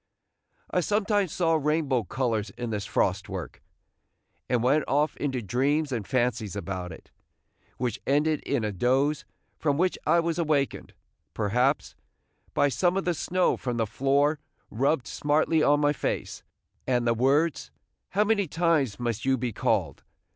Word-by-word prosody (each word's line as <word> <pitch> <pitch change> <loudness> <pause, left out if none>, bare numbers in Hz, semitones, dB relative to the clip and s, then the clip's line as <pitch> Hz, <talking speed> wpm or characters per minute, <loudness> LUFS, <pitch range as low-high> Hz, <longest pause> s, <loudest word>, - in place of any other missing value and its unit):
I - - +2
sometimes 205 0 +1
saw 165 -2 +1
rainbow 150 -6 +1
colors 115 -3 -1
in 120 -2 -4
this 105 -2 -3
frost 95 0 0
work, - - -6 0.9
and 120 -2 +1
went 145 +4 +3
off 145 +3 +1
into 130 -4 -2
dreams 140 - 0
and 115 -6 -3
fancies 120 -5 0
about 90 -2 -4
it, 80 - -13 0.7
which 120 -3 -2
ended 150 +2 +2
in 135 -5 -1
a 105 - -1
doze, 135 +9 +1 0.3
from 145 -2 +1
which 180 +2 +1
I 170 - +5
was 170 0 -1
awakened, 150 -4 -1 0.4
perhaps, 125 +7 +1 0.6
by 145 - +4
some 175 +8 +1
of 195 - -1
the 175 - +2
snow 180 +3 +1
from 125 -2 -3
the 115 - +1
floor 140 +6 +1 0.3
rubbed 135 +3 +1
smartly 155 +2 +1
on 145 0 +4
my 145 0 +3
face, - - -3 0.5
and 125 -2 +1
the 115 - +3
words, 140 +7 +1 0.4
"How 205 - +2
many 205 -3 +1
times 155 -8 +1
must 120 -3 -2
you 135 0 +2
be 120 -2 -3
called?" - - 0
140 Hz, 155 wpm, -27 LUFS, 120-155 Hz, 0.9 s, I